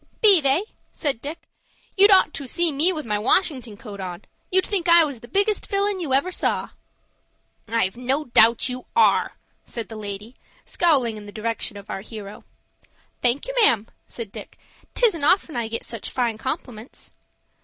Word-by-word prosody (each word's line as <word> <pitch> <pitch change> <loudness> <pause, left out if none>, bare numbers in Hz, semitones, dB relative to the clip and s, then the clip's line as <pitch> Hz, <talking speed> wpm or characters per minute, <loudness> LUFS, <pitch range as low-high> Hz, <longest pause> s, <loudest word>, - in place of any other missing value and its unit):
"Be 405 -7 +7
they?" 280 +6 +2 0.3
said 275 -6 -2
Dick. 300 +4 -7 0.5
"You'd 405 +1 +6
ought 380 -5 +5
to 280 - -6
see 345 +5 0
me 300 +6 +3
with 310 -4 -5
my 210 -2 -1
Washington 250 - 0
coat 210 -4 -10
on. 180 -2 -7 0.2
You'd 375 0 +2
think 370 -4 -1
I 340 0 +8
was 280 -6 -5
the 240 - -13
biggest 405 - 0
villain 400 -1 0
ever 280 +4 +1
you - - -7
saw." - - -1 1.0
"I've 225 -5 0
no 260 +5 -1
doubt 230 -1 +4
you 250 -1 -6
are," 460 - +3 0.3
said 230 -2 -6
the 225 - -8
lady, 210 +2 -7 0.3
scowling 265 -10 +1
in 205 -1 -10
the - - -9
direction 220 -1 -4
of 200 +2 -10
our 195 - -4
hero. 210 -1 -10 0.8
"Thank 250 - +1
you, - - -4
ma'am," 230 - +4 0.2
said 225 -4 -7
Dick. - - -10 0.4
"'Tisn't 415 -11 +3
often 345 0 +2
I 235 -2 -2
get 230 +1 -4
such 230 -3 -6
fine 235 -4 -1
compliments." 250 -4 -7
255 Hz, 175 wpm, -23 LUFS, 220-340 Hz, 1.0 s, I